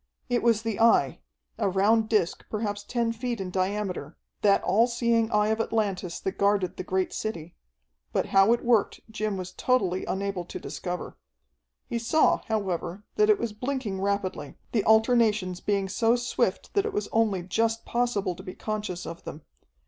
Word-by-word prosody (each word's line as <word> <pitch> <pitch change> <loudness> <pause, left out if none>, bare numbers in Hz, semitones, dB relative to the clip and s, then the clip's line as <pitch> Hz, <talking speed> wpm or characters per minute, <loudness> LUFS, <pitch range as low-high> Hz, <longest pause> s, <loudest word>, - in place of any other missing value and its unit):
It 245 -1 +1
was 230 -2 +2
the 225 -3 -2
Eye, 225 - +4 0.4
a - - +2
round 215 +4 +3
disc 205 -6 +1
perhaps 205 -1 -3
ten 235 +1 -1
feet 235 0 -3
in 185 -2 -4
diameter, 190 +1 -2 0.2
that 200 -1 +4
all 230 +4 +4
seeing 235 -2 +1
Eye 210 -1 +2
of 220 +1 +1
Atlantis 195 -6 -1
that 190 - -4
guarded 200 -2 +2
the - - -4
great 185 0 -1
city, 175 -7 -5 0.6
but - - 0
how 195 +3 +5
it 235 - +1
worked 235 -4 +2
Jim 215 -2 -2
was 185 -1 -5
totally 190 -6 +1
unable 195 -1 -2
to 175 - -7
discover. 175 +5 -6 0.7
He 235 - -2
saw, 270 +7 +3
however, 195 -3 -2
that 425 0 +3
it 425 - +6
was 230 - -3
blinking 230 -4 -3
rapidly, 195 -8 -2
the 215 -4 +1
alternations 220 -5 +3
being 200 -2 0
so 225 +4 +2
swift 240 -5 -1
that 405 +1 +2
it 435 - -4
was 415 - -1
only 215 -5 +1
just 225 +5 0
possible 235 -6 0
to - - -11
be 185 - -8
conscious 210 -5 -4
of 170 - -8
them. 150 - -8
210 Hz, 170 wpm, -27 LUFS, 190-230 Hz, 0.7 s, it